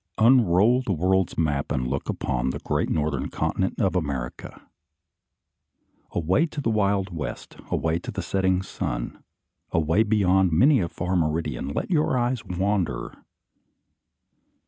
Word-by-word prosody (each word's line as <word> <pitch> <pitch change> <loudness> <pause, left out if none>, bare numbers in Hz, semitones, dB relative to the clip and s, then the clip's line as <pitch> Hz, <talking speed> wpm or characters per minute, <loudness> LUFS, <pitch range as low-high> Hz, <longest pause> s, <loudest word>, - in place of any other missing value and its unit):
Unroll 115 0 +5
the 125 - -3
world's 95 +2 +1
map, 75 -4 0
and 65 -3 -1
look 70 +3 -3
upon 65 -1 -1
the 65 - -3
great - - -1
northern 75 -3 -1
continent - - -2
of - - +1
America. 70 -8 -4 1.4
Away 95 - +1
to 150 - -7
the 125 -5 0
wild 100 -3 0
west, 75 - -6
away 80 +1 0
toward - - -8
the - - -3
setting 95 -1 +1
sun, - - -4 0.5
away 80 +5 +2
beyond 95 -4 +3
many 130 - +5
a 85 -4 -1
far 90 +2 -3
meridian, 80 -4 -1
let 70 - -3
your 150 -6 +2
eyes 120 -1 0
wander. 95 -1 -1
90 Hz, 135 wpm, -25 LUFS, 80-105 Hz, 1.4 s, Unroll